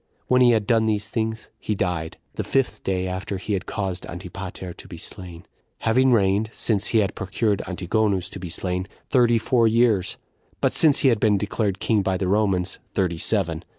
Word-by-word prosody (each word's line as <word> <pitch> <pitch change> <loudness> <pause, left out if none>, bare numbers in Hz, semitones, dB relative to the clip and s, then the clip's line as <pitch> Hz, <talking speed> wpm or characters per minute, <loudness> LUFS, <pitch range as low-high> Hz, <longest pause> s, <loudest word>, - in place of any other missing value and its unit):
When 125 0 +3
he 125 - +7
had 110 -3 +3
done 110 0 +3
these 105 0 -1
things, 110 -1 -3
he 105 - -2
died, 85 -4 -2 0.2
the - - -3
fifth 135 -1 0
day 95 -1 -1
after 95 +2 -4
he 105 +3 -3
had 95 - -2
caused 95 -3 -3
Antipater 90 0 -7
to - - -13
be - - -9
slain; 90 -2 -7 0.4
having 130 +4 +3
reigned, 105 -1 +2
since 105 -4 +1
he 115 - +2
had 100 0 -1
procured 100 +1 -1
Antigonus 95 +1 0
to 95 - -6
be 90 -1 -6
slain, 90 +2 -2 0.2
thirty 120 -3 +4
four 115 +1 +3
years; 110 -5 +2 0.4
but - - +1
since 150 -4 +4
he 135 - +5
had 115 -4 +2
been 105 -2 +3
declared 100 0 -1
king 110 -3 +2
by 95 -1 0
the 95 - -1
Romans, 95 -2 +1 0.2
thirty 90 -4 0
seven. 85 -7 0
100 Hz, 190 wpm, -23 LUFS, 95-110 Hz, 0.4 s, he